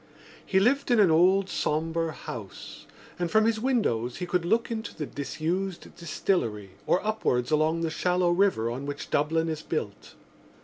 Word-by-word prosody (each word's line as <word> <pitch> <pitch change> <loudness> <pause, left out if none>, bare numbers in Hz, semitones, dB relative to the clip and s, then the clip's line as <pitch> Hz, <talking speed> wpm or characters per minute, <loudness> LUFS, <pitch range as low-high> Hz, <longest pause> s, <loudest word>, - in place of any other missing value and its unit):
He 190 - +2
lived 275 +8 +2
in 240 -2 +4
an 195 -5 +5
old 185 +4 +4
sombre 165 -1 -1
house 110 -8 -9 0.3
and 175 -1 -1
from 220 +3 +4
his 225 -1 +1
windows 165 - 0
he 180 - -3
could 175 -1 -1
look 225 +6 +1
into 220 0 -4
the 155 - -4
disused 170 +7 -4
distillery 120 - -2 0.2
or 185 - +2
upwards 125 - 0
along 155 +2 +2
the 165 -1 -1
shallow 180 +1 +1
river 175 - +2
on 135 +4 -5
which 145 0 -6
Dublin 160 +3 +1
is 155 -1 -3
built. 105 -13 -5
165 Hz, 165 wpm, -27 LUFS, 150-195 Hz, 0.3 s, an